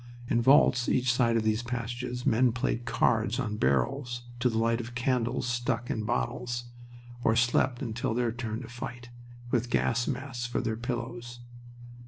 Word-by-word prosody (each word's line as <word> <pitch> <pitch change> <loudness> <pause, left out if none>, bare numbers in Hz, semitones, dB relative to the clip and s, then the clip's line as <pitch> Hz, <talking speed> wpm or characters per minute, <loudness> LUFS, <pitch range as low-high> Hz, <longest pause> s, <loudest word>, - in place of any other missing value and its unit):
In 120 - +2
vaults 125 -2 +5
each 125 -1 +2
side 115 -2 +3
of 110 - +1
these 110 +1 +1
passages 125 +1 -4
men 125 -2 +4
played 120 -1 -1
cards 115 -2 +1
on 105 -4 -2
barrels, 120 - 0 0.2
to 125 0 +3
the 115 - -2
light 115 +1 +2
of 120 +1 -9
candles 125 -1 0
stuck 120 0 -1
in 110 -1 -2
bottles, 120 +1 -2 0.6
or 110 - +3
slept 120 +2 +2
until 120 0 -2
their 120 -1 +1
turn 115 0 -4
to - - -8
fight, 120 0 -7 0.4
with 120 -1 +1
gas 120 0 +1
masks 130 -2 -3
for 120 - -1
their 115 -3 -1
pillows. 120 0 -5
120 Hz, 165 wpm, -29 LUFS, 115-125 Hz, 0.6 s, vaults